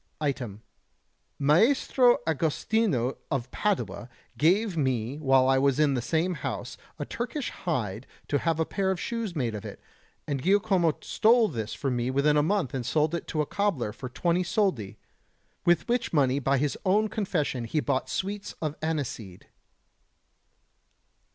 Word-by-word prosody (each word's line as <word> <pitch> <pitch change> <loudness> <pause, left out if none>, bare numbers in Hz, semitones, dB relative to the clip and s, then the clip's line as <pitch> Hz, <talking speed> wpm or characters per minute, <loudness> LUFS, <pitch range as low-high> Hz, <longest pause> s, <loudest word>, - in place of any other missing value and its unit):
Item: 125 -8 -3 0.7
Maestro 240 - +4
Agostino 160 - 0
of 130 -2 -2
Padua 200 - -2 0.3
gave 190 +5 +2
me 130 -2 -1
while 135 -3 +4
I 135 0 +4
was 140 0 +2
in 150 -2 +4
the 125 - 0
same 165 +8 0
house - - -5 0.2
a - - -4
Turkish 245 +3 -4
hide 120 - -3 0.2
to 145 - +1
have 165 -1 0
a 160 - +2
pair 195 +2 -1
of 190 -2 -1
shoes 230 -5 -3
made 120 -7 -1
of 105 - -6
it, - - -8 0.5
and 140 -3 -2
Giacomo 185 -3 +2
stole 225 0 +3
this 110 -2 -4
from 135 -3 -2
me 120 +1 -1
within 140 +3 +2
a 150 - +5
month 170 -3 0
and 130 -2 -2
sold 150 +6 +1
it 170 - -3
to 155 - -1
a - - 0
cobbler 155 - -1
for 130 - -7
20 170 +7 0
soldi, 175 - -1 0.7
with 175 0 +3
which 240 0 0
money 140 -3 +2
by 135 0 +1
his 145 +1 0
own 205 +3 +3
confession 170 - -2
he 150 +7 -1
bought 130 -3 -1
sweets 200 +8 -4
of 155 -2 -3
aniseed. 135 - -4
150 Hz, 155 wpm, -27 LUFS, 130-190 Hz, 0.7 s, a